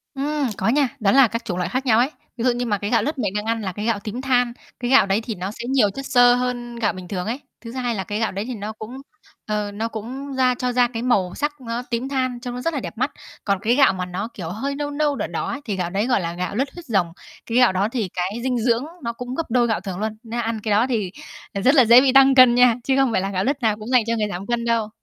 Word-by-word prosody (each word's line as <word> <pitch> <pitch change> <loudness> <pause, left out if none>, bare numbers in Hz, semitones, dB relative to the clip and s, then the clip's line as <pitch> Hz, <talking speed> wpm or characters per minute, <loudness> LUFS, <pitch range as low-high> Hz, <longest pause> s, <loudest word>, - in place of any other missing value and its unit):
Ừm, 290 0 -1
có - - -1
nha. 275 0 +3
Đó 200 -2 +3
là 270 -3 +6
các 230 +3 -5
chủng 180 -5 -3
loại 180 - -1
khác 260 +2 -2
nhau 225 -2 +4
ấy. 255 - +3 0.3
Ví 230 - -3
dụ 250 - +5
như 245 +1 -2
mà 205 -3 0
cái 205 +2 -4
gạo 230 -3 +2
lứt 300 +3 -2
mình 205 -5 -1
đang 210 +1 -2
ăn 225 0 -1
là 190 -2 -3
cái 210 +2 -5
gạo 230 -3 +1
tím 230 +4 -5
than, 245 -2 +1 0.3
cái 245 0 -2
gạo 265 -7 +7
đấy 200 +3 +1
thì 225 -2 -5
nó 185 +3 -4
sẽ 235 +2 -8
nhiều 255 -6 +3
chất 270 +7 -7
xơ 245 -2 +5
hơn 245 -1 -3
gạo 235 -2 0
bình 185 -1 -9
thường 180 -1 -3
ấy. 240 +5 -2 0.2
Thứ 230 -1 -8
hai 245 -2 -2
là 190 - -2
cái 210 +2 -4
gạo 225 - 0
đấy 200 +3 -4
thì 250 0 -5
nó 210 0 -5
cũng, 220 +4 -9 0.5
ờ, 210 -1 -2
nó 215 +3 -3
cũng 255 +6 -6
ra 255 -1 +2
cho 250 0 -1
ra 245 0 +3
cái 235 -1 -5
màu 195 -8 +1
sắc 295 -1 -3
nó 235 0 -3
tím 245 +2 -2
than, 255 -3 -1
trông 245 0 -6
nó 250 - -5
rất 330 +5 -1
là 285 - -1
đẹp 235 - -7
mắt. 260 +4 0 0.3
Còn 200 -2 0
cái 235 +4 +2
gạo 275 -8 +5
mà 185 -1 -3
nó, 180 +4 -4
kiểu, 165 -4 -6
hơi 270 +9 -3
nâu 290 0 -3
nâu, 290 -1 0
đỏ - - -3
đỏ - - -3
ấy, 285 - -4
thì 210 - -2
gạo 180 -2 -2
đấy 200 +5 -1
gọi 245 -6 +2
là 170 -1 -3
gạo 180 +3 -4
lứt 265 +4 0
huyết 350 -1 -10
rồng. 195 -8 +1 0.4
Cái 230 - -1
gạo 250 -4 +6
đó 190 +2 +1
thì 225 -7 -2
cái 185 +4 -2
dinh 255 -2 0
dưỡng 235 +2 +1 0.2
nó 235 0 -2
cũng 250 +2 -6
gấp 330 - -1
đôi 240 0 +3
gạo 220 -5 0
thường 190 -2 -5
luôn. 215 0 -3
Nên 235 +1 -4
ăn 225 -1 -2
cái 215 - -1
đó 215 +5 +3
thì, 210 -7 -1 0.4
ờ, 200 - -3
rất 270 +7 +4
là 260 - +7
dễ 235 +3 +8
bị 265 -1 +3
tăng 270 0 +7
cân 255 -2 +8
nha, 245 -2 +5
chứ 265 - +1
không 270 -3 +3
phải 190 - +1
là 195 - -2
gạo 190 0 -1
lứt 275 +2 -1
nào 215 -2 +1
cũng 215 0 -9
dành 250 -3 +4
cho 230 - +1
người 210 -1 0
giảm 180 +1 -5
cân 240 -1 -1
đâu. 230 -2 +1
235 Hz, 310 wpm, -22 LUFS, 210-255 Hz, 0.5 s, dễ